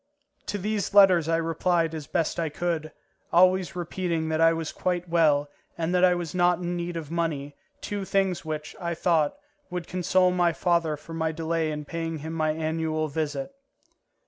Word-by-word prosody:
To 205 - -2
these 205 0 -2
letters 185 -5 +6
I 165 - +3
replied 165 0 +1
as 155 -3 -6
best 165 0 -1
I 165 -2 0
could, 155 0 -2 0.4
always 185 +1 +4
repeating 170 -2 -2
that 160 0 0
I 165 0 +6
was 165 -1 -3
quite 180 -1 -2
well 155 -4 +3 0.3
and 170 +1 -1
that 180 0 +3
I 180 -1 +6
was 175 -3 -4
not 175 -1 +3
in 175 0 -3
need 175 0 -3
of 160 -2 -6
money, 150 -4 -2 0.3
two 205 -1 -3
things 190 -2 0
which, 155 -1 -5
I 170 -2 -2
thought, 160 -3 +1 0.3
would 180 -1 -4
console 185 +1 +2
my 175 -2 +2
father 170 -3 +1
for 155 +3 -11
my 160 -1 -1
delay 165 0 -1
in 150 -1 -4
paying 165 +1 -4
him 160 +2 -6
my 155 -1 0
annual 155 0 -1
visit. 145 - -3
165 Hz, 180 wpm, -26 LUFS, 160-180 Hz, 0.4 s, letters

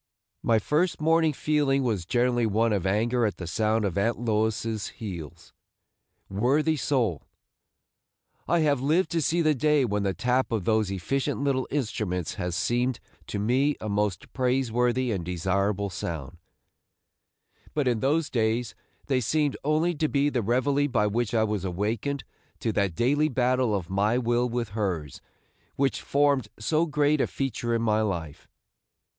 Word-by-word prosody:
My 115 -1 +3
first 155 - 0
morning 160 0 +3
feeling 145 -2 +1
was 105 -9 -1
generally 120 0 +2
one 110 +2 +2
of 95 -2 0
anger 115 +5 +1
at 105 -5 0
the 90 - -6
sound 110 +5 0
of 100 0 -1
Aunt 115 +4 +1
Lois's 110 -1 -1
heels, 85 -9 -8 0.7
worthy 135 +10 +1
soul! 125 - -1 1.2
I 170 -1 +3
have 145 -4 +2
lived 155 +5 +2
to 165 - +1
see 165 +3 +1
the 155 -1 +4
day 150 0 +2
when 105 -3 -1
the 95 -2 -1
tap 125 +7 0
of 110 -6 -1
those 110 -2 +2
efficient 120 +9 -2
little 135 -2 0
instruments 105 - -2
has 90 -2 -3
seemed 120 +7 0 0.3
to - - -4
me 130 +8 +2
a 110 - -5
most 100 -3 -2
praiseworthy 125 -1 +1
and 95 -5 -2
desirable 95 +3 -1
sound; 80 -2 -5 1.4
but 145 -3 +1
in 120 -3 +1
those 145 +4 +1
days 115 0 0 0.3
they 130 -3 +1
seemed 145 +4 +1
only 155 +4 +2
to 155 0 0
be 140 0 +2
the 130 -4 -1
reveille 135 +6 +1
by 115 -6 +1
which 115 +2 -1
I 110 - +3
was 105 -3 -1
awakened 105 +9 -2 0.4
to 115 - 0
that 100 -5 0
daily 145 - +2
battle 125 -3 +1
of 90 -4 -3
my 105 +5 +1
will 120 0 +1
with 120 -1 -2
hers 95 - -3 0.5
which 135 0 0
formed 140 -4 +2
so 155 +9 +1
great 150 -1 +2
a - - +1
feature 120 -3 -2
in 115 - 0
my 110 -1 +2
life. 85 -8 -4
120 Hz, 160 wpm, -26 LUFS, 105-140 Hz, 1.4 s, the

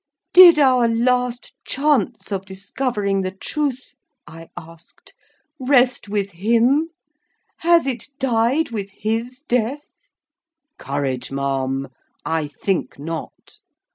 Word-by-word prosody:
"Did 355 -3 +9
our 255 -4 +4
last 245 +1 0
chance 245 -8 0
of 195 -1 -2
discovering 200 0 -2
the 185 - -2
truth," 260 +7 -4 0.3
I 165 0 -12
asked, 165 0 -14 0.5
"rest 250 -4 +2
with 200 -1 -2
him? 235 - +2 0.7
Has 340 -1 +3
it 250 -5 -3
died 255 +2 +1
with 200 -3 -4
his 225 +6 -4
death?" 250 +5 -1 0.9
"Courage, 135 -3 -3
ma'am! 135 -1 -2 0.4
I 160 -2 -1
think 185 +5 -3
not. 160 +3 -8
225 Hz, 105 wpm, -20 LUFS, 180-255 Hz, 0.9 s, Did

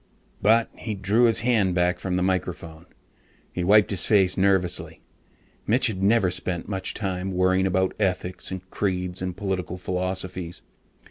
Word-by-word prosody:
_ - - -31
But 110 +2 +3
he 110 -2 -4
drew 100 +5 +2
his 115 -1 +3
hand 110 -7 +2
back 90 0 +1
from 90 0 -2
the 90 - +1
microphone. 85 -3 -3 0.7
He 90 - -2
wiped 105 +3 +5
his 95 -3 -1
face 95 -4 +3
nervously. 90 -4 0 0.7
Mitch 125 +4 +3
had 105 -6 -2
never 100 -2 +3
spent 90 -1 -3
much 95 -2 -2
time 95 -2 -3
worrying 95 +1 +2
about 95 0 +1
ethics 90 -2 -2
and 95 0 -7
creeds 90 -2 -2
and 90 -1 -4
political 90 -3 -3
philosophies. 90 -1 -4
95 Hz, 155 wpm, -24 LUFS, 90-100 Hz, 0.7 s, wiped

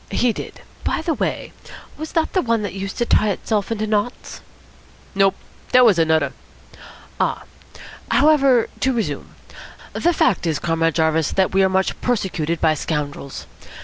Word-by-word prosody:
"He 245 -2 +1
did. - - -8 0.2
By - - -1
the 325 - 0
way, - - -3 0.4
was 315 +1 -7
that 325 -1 0
the 370 - +2
one 230 -5 0
that 200 - -4
used 195 0 -5
to 240 - +1
tie 215 -2 +3
itself 205 +1 -2
into 215 -1 -1
knots?" 215 +3 -2 0.7
"Nope. 195 -1 +3 0.4
Dat 250 0 +7
was 200 -7 +4
anudder." 160 -3 +2 0.9
"Ah! - - 0 0.7
However, 275 -5 +4
to 265 0 +1
resume. 230 -3 -4 0.6
The 345 - +2
fact 195 - +1
is, 160 -3 0
Comrade 165 0 0
Jarvis, 160 -1 +1 0.2
we 195 - +4
are 190 - +3
much 190 0 0
persecuted 175 -9 -1
by 155 - +3
scoundrels. 145 -3 -4
200 Hz, 150 wpm, -20 LUFS, 165-245 Hz, 0.9 s, Dat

